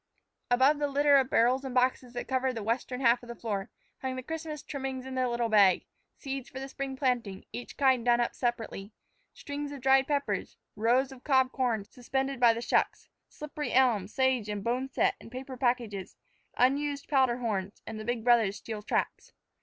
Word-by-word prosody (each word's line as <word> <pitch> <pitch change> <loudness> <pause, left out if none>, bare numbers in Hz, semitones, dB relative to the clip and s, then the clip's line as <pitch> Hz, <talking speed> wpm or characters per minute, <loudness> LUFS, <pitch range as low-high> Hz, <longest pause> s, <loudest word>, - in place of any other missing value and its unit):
Above 265 +4 +4
the 290 - +1
litter 285 0 +4
of 265 -1 +2
barrels 250 +4 +3
and 260 -2 -5
boxes 250 -1 +1
that 245 - -5
covered 260 0 0
the 225 - -4
western 250 +3 -2
half 240 -1 +4
of 240 - -13
the 235 - -6
floor, 205 -4 -3 0.3
hung 260 -1 -3
the 255 - -5
Christmas 315 0 -5
trimmings 265 -2 -5
in 265 - -6
their 255 -1 +1
little 235 -1 0
bag; 200 -4 +5 0.3
seeds 270 -2 -6
for 260 - -7
the 270 - -5
spring 270 0 -5
planting, 240 -8 -1
each 245 - -7
kind 260 -3 +3
done 240 0 +4
up 240 - 0
separately; 225 -4 -3 0.4
strings 285 0 -6
of 285 - -7
dried 265 +1 +4
peppers; 285 -1 -2 0.2
rows 245 +5 +2
of 260 -1 -13
cob 260 -3 +3
corn, 235 -6 0
suspended 265 +4 -3
by 240 -2 +7
the 230 +1 -3
shucks; - - 0 0.2
slippery 300 0 -5
elm, 240 -7 +3
sage, 255 -2 +1
and 205 -1 -3
boneset 255 +3 +1
in - - -11
paper 260 +2 -7
packages; 240 -6 -1 0.4
unused 280 +3 +1
powder 260 -4 +3
horns; 205 -5 -3
and 220 -1 -6
the - - -5
big 240 -1 -2
brothers' 225 -4 +3
steel 220 -2 -6
traps. 210 - -2
255 Hz, 190 wpm, -29 LUFS, 235-270 Hz, 0.4 s, by